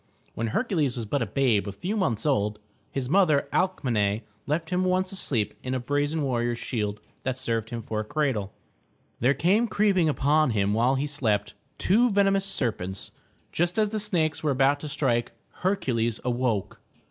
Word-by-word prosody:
When 115 Hz, -, -2 dB
Hercules 155 Hz, -, 0 dB
was 120 Hz, -3 st, -4 dB
but 135 Hz, +6 st, -1 dB
a 115 Hz, -, 0 dB
babe 110 Hz, -3 st, +2 dB
a -, -, -2 dB
few 180 Hz, -, -4 dB
months 120 Hz, -, 0 dB
old, 105 Hz, -8 st, +1 dB, 0.3 s
his 135 Hz, -2 st, -3 dB
mother, 155 Hz, -3 st, +3 dB
Alc 185 Hz, -1 st, +1 dB
me'ne, 105 Hz, -4 st, +1 dB, 0.3 s
left 160 Hz, +3 st, -1 dB
him 180 Hz, +1 st, +1 dB
once 185 Hz, 0 st, +1 dB
asleep 130 Hz, -, -1 dB
in 130 Hz, 0 st, -3 dB
a -, -, 0 dB
brazen 145 Hz, +4 st, 0 dB
warrior's 120 Hz, -3 st, 0 dB
shield 105 Hz, -4 st, -3 dB, 0.2 s
that 130 Hz, -1 st, -2 dB
served 115 Hz, -3 st, -2 dB
him 115 Hz, -1 st, -5 dB
for 110 Hz, 0 st, -3 dB
a -, -, -1 dB
cradle. 125 Hz, -6 st, -1 dB, 0.7 s
There 130 Hz, +4 st, +3 dB
came 195 Hz, -, +3 dB
creeping 200 Hz, -6 st, +2 dB
upon 150 Hz, +1 st, +3 dB
him 100 Hz, 0 st, +2 dB
while 120 Hz, +5 st, +3 dB
he 135 Hz, +2 st, 0 dB
slept, 110 Hz, -8 st, -1 dB, 0.2 s
two 235 Hz, +6 st, +3 dB
venemous 195 Hz, -1 st, +3 dB
serpents. 100 Hz, -, -2 dB, 0.4 s
Just 175 Hz, +3 st, 0 dB
as 215 Hz, -1 st, +3 dB
the 215 Hz, -, -1 dB
snakes 170 Hz, -7 st, 0 dB
were 155 Hz, -, 0 dB
about 135 Hz, +1 st, +3 dB
to 150 Hz, -, -6 dB
strike, 130 Hz, -5 st, 0 dB, 0.2 s
Hercules 120 Hz, -, 0 dB
awoke. 120 Hz, -5 st, -1 dB
135 Hz, 175 wpm, -26 LUFS, 115-175 Hz, 0.7 s, mother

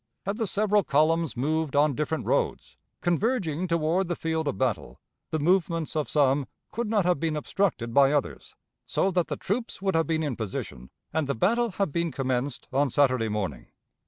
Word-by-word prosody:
Had 200 Hz, +2 st, -2 dB
the 225 Hz, -3 st, -1 dB
several 210 Hz, +1 st, +2 dB
columns 160 Hz, 0 st, +2 dB
moved 155 Hz, +2 st, 0 dB
on 145 Hz, 0 st, +4 dB
different 150 Hz, +3 st, -2 dB
roads, -, -, -1 dB, 0.3 s
converging 180 Hz, -, 0 dB
toward 170 Hz, +2 st, +1 dB
the 175 Hz, -, -1 dB
field 160 Hz, -1 st, -2 dB
of 140 Hz, -, -1 dB
battle, 110 Hz, -, -2 dB, 0.3 s
the 160 Hz, -, -1 dB
movements 165 Hz, 0 st, +1 dB
of 155 Hz, -2 st, -1 dB
some 140 Hz, -2 st, +2 dB, 0.2 s
could 235 Hz, -1 st, -3 dB
not 210 Hz, -4 st, +2 dB
have 180 Hz, -5 st, +2 dB
been 160 Hz, -1 st, -1 dB
obstructed 150 Hz, -, -1 dB
by 140 Hz, +1 st, +6 dB
others, 145 Hz, -2 st, -2 dB, 0.3 s
so 195 Hz, -, +1 dB
that 180 Hz, -2 st, +1 dB
the -, -, -3 dB
troops 230 Hz, +5 st, -3 dB
would 190 Hz, 0 st, 0 dB
have 165 Hz, 0 st, +2 dB
been 160 Hz, -1 st, 0 dB
in 145 Hz, -5 st, -2 dB
position 95 Hz, -, -5 dB, 0.2 s
and 160 Hz, -3 st, 0 dB
the 140 Hz, -, -1 dB
battle 235 Hz, -, +2 dB
have 195 Hz, -4 st, -1 dB
been 170 Hz, +2 st, -1 dB
commenced 130 Hz, -1 st, -2 dB
on 140 Hz, +1 st, +2 dB
Saturday 130 Hz, -4 st, +2 dB
morning. 95 Hz, -, -3 dB
160 Hz, 185 wpm, -27 LUFS, 140-180 Hz, 0.3 s, by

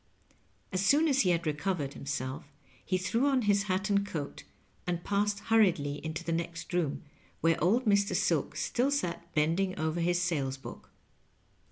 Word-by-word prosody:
As 185 Hz, 0 st, 0 dB
soon 295 Hz, +10 st, +4 dB
as 275 Hz, -2 st, +3 dB
be 185 Hz, -, +2 dB
bad 170 Hz, -1 st, 0 dB
recovered 150 Hz, -1 st, -1 dB
himself, 135 Hz, -2 st, -4 dB, 0.4 s
be 185 Hz, -, +3 dB
threw 230 Hz, +8 st, +1 dB
on 270 Hz, -2 st, +3 dB
bis 205 Hz, -2 st, +2 dB
hat 190 Hz, +1 st, 0 dB
and 200 Hz, 0 st, +3 dB
coat, 155 Hz, -8 st, -5 dB, 0.4 s
and 175 Hz, -1 st, -2 dB
passed 205 Hz, 0 st, 0 dB
bnrriedly 170 Hz, -11 st, +2 dB
into 160 Hz, +1 st, -4 dB
the 170 Hz, -, -3 dB
next 170 Hz, +1 st, -3 dB
room, 170 Hz, -5 st, 0 dB, 0.4 s
where 165 Hz, +1 st, +2 dB
old 230 Hz, +9 st, +3 dB
Mr. 200 Hz, -1 st, +3 dB
Silk -, -, +1 dB
stiU 255 Hz, +4 st, 0 dB
sat 170 Hz, -10 st, -2 dB
bending 170 Hz, +5 st, +1 dB
over 160 Hz, +2 st, -1 dB
his 175 Hz, +1 st, +2 dB
sales 145 Hz, -7 st, -1 dB
book. 135 Hz, -, -10 dB
180 Hz, 165 wpm, -30 LUFS, 160-200 Hz, 0.4 s, soon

